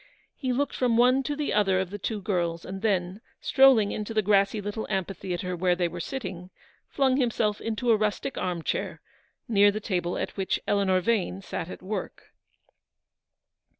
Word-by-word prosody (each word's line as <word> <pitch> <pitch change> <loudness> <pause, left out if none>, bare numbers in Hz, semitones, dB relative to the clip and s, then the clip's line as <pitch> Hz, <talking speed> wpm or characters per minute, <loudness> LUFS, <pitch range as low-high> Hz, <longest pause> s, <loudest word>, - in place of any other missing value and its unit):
He 260 -3 -2
looked 280 +3 -1
from 245 -3 +2
one 250 +2 +5
to 290 +2 -3
the 295 0 -2
other 195 -3 +3
of 190 -1 -3
the 205 - -6
two 210 0 -3
girls, 170 -4 -1
and 195 +1 -6
then, 190 -2 0 0.2
strolling 260 -6 +5
into 215 +1 -4
the 215 - +3
grassy 200 +1 +3
little 205 +2 -4
amphitheatre 185 -2 -3
where 180 0 +2
they 175 -1 +1
were - - -7
sitting, 185 -10 -5 0.4
flung 265 -2 +2
himself 225 -5 0
into 225 +2 0
a - - +6
rustic 215 +5 -1
arm 175 -3 -2
chair, - - -2 0.5
near 205 -2 +5
the 205 +1 -2
table 180 -5 -2
at - - -4
which 195 -1 -1
Eleanor 195 -2 +2
Vane 195 -2 0
sat 170 - -5
at - - -9
work. 205 +3 -6
205 Hz, 175 wpm, -27 LUFS, 185-230 Hz, 0.5 s, a